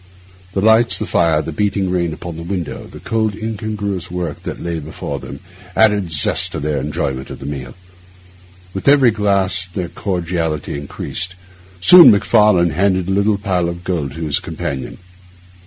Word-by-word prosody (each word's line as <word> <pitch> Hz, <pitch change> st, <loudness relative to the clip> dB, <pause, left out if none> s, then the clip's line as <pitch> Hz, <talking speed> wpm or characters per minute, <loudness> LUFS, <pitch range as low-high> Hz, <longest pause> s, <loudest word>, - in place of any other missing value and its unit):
The 95 Hz, -, 0 dB
lights, 110 Hz, +2 st, +4 dB
the -, -, -3 dB
fire, 80 Hz, -2 st, +2 dB
the 80 Hz, -, -5 dB
beating 100 Hz, +2 st, -1 dB
rain 85 Hz, -2 st, 0 dB
upon 85 Hz, +2 st, -7 dB
the 80 Hz, -, -7 dB
window, 85 Hz, -1 st, -5 dB
the -, -, -11 dB
cold, 110 Hz, -2 st, -1 dB
incongruous 105 Hz, -4 st, -4 dB
work 90 Hz, -1 st, -4 dB
that -, -, -6 dB
lay 85 Hz, -1 st, -3 dB
before 80 Hz, +1 st, -6 dB
them, -, -, -9 dB, 0.3 s
added 105 Hz, -5 st, +3 dB
zest 75 Hz, -3 st, +2 dB
to -, -, -3 dB
their 75 Hz, -1 st, -1 dB
enjoyment 65 Hz, -2 st, -3 dB
of -, -, -7 dB
the 70 Hz, -, -10 dB
meal. 70 Hz, -3 st, -6 dB, 1.0 s
With 95 Hz, -, -5 dB
every 140 Hz, -4 st, +6 dB
glass 100 Hz, -4 st, +1 dB
their 90 Hz, -3 st, -4 dB
cordiality 85 Hz, -6 st, -3 dB
increased. 85 Hz, +5 st, -3 dB, 0.5 s
Soon 175 Hz, -, +10 dB
Macfarlane 105 Hz, -4 st, +4 dB
handed 95 Hz, +2 st, +1 dB
a -, -, 0 dB
little 100 Hz, +2 st, +2 dB
pile 95 Hz, -4 st, -1 dB
of 85 Hz, 0 st, -7 dB
gold 80 Hz, -8 st, -3 dB
to 80 Hz, -, -8 dB
his 75 Hz, -2 st, +1 dB
companion. 75 Hz, -5 st, -5 dB
90 Hz, 165 wpm, -18 LUFS, 80-100 Hz, 1.0 s, Soon